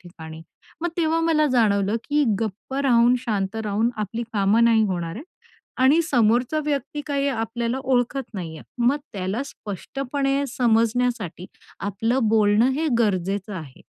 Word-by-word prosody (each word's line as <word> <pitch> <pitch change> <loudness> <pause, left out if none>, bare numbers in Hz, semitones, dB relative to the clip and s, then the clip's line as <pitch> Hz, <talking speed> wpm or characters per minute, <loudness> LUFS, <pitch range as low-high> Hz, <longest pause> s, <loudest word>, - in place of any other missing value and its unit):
ठिकाणी, 160 -2 -11 0.4
मग 345 - 0
तेव्हा 330 -1 +1
मला 320 -2 +3
जाणवलं 205 -3 +2
की 295 0 +1 0.2
गप्प 220 +4 -5
राहून, 245 -3 +4
शांत 210 -4 -2
राहून 215 +3 +1
आपली 215 +2 -3
कामं 210 +2 +3
नाही 230 -1 +4
होणार 175 -3 -3
आहे 275 - -8 0.6
आणि 290 +6 +5
समोरचा 240 +4 +2
व्यक्ती 295 0 -2
काही 280 -1 0
आपल्याला 235 +1 -2
ओळखत 255 0 0
नाही 165 -5 -6
आहे, - - -12 0.2
मग 280 +4 +3 0.2
त्याला 195 +5 -2
स्पष्टपणे 275 +5 -3
समजण्यासाठी 230 -5 +1 0.3
आपलं 225 +5 0
बोलणं 215 +2 +4
हे 310 +4 -1
गरजेचं 195 -1 0
आहे. 155 -8 -9
230 Hz, 140 wpm, -23 LUFS, 200-270 Hz, 0.6 s, आणि